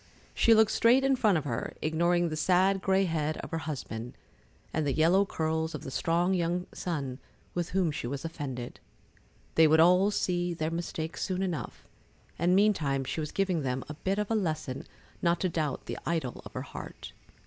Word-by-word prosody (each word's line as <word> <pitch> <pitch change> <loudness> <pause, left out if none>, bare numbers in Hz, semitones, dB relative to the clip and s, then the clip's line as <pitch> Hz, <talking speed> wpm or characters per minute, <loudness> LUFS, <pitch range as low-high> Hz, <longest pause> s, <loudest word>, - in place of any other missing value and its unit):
She 230 - +5
looked 220 -1 +5
straight 245 +3 +4
in 270 0 +3
front 215 -7 +3
of 155 - -2
her, 145 - -3
ignoring 170 +2 +1
the 155 - -3
sad 185 +4 +3
gray 190 0 +3
head 155 -3 -1
of - - -7
her 165 - -1
husband, 130 -6 -6 0.6
and 155 - 0
the 140 - +1
yellow 180 +7 +4
curls 160 -1 -1
of - - -7
the 135 - -6
strong 170 +6 +1
young 175 0 0
son 140 -7 -3 0.3
with 175 -1 -2
whom 185 -4 +1
she 130 - -4
was 140 +4 -4
offended. 135 -7 -5 0.7
They 160 0 +6
would 160 +1 +5
all 180 +4 +6
see 175 -3 0
their 160 0 -2
mistake 165 -1 -4
soon 185 0 -1
enough, 180 -5 -4 0.5
and 175 +1 +3
meantime 160 -10 +2
she 160 - -3
was 150 -1 -3
giving 190 -4 0
them 130 -1 -2
a - - -4
bit 190 +6 -2
of 210 +1 -2
a - - +3
lesson 155 -9 -2 0.3
not 170 0 +2
to 185 - +1
doubt 155 -5 -2
the - - -5
idol 160 -7 -2
of - - -16
her - - -4
heart. - - -9
165 Hz, 190 wpm, -29 LUFS, 155-185 Hz, 0.7 s, They